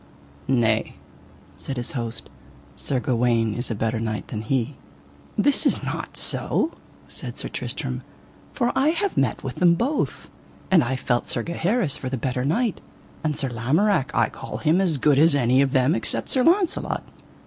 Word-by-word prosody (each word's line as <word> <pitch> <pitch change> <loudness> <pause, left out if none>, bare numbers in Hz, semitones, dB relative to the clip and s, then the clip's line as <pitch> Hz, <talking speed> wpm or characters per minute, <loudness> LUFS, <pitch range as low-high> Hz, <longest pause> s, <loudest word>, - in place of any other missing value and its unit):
Nay, 115 -4 +1 0.6
said 135 - -5
his 120 - -3
host, 115 -3 -5 0.4
Sir 130 - -2
Gawaine 115 -3 +1
is 120 +3 -2
a 115 - -2
better 110 +2 -1
knight 110 -1 -3
than 110 - -4
he. 130 +4 -1 0.6
That 275 +7 +3
is - - +1
not - - -4
so, 320 - +1 0.4
said - - -5
Sir - - -4
Tristram, - - -4 0.5
for 240 -2 0
I 270 - +3
have 340 +5 +1
met 130 -6 0
with 130 -2 -5
them 175 -1 +5
both, 265 - -1 0.4
and 175 -5 +6
I 125 +2 -1
felt 120 -1 -1
Sir 120 - -2
Gaheris 170 - 0
for 130 - -5
the 130 - -2
better 125 +1 -2
knight, 215 - 0 0.4
and 150 -2 -1
Sir 135 - -1
Lamorak 135 - +1
I - - +3
call - - -7
him 165 +5 +2
as 170 -6 +2
good 140 0 +3
as 160 0 +5
any 130 -1 +3
of 135 -1 +2
them 130 +2 +3
except - - 0
Sir 255 - +2
Launcelot. 355 +2 +2
135 Hz, 170 wpm, -24 LUFS, 120-180 Hz, 0.6 s, and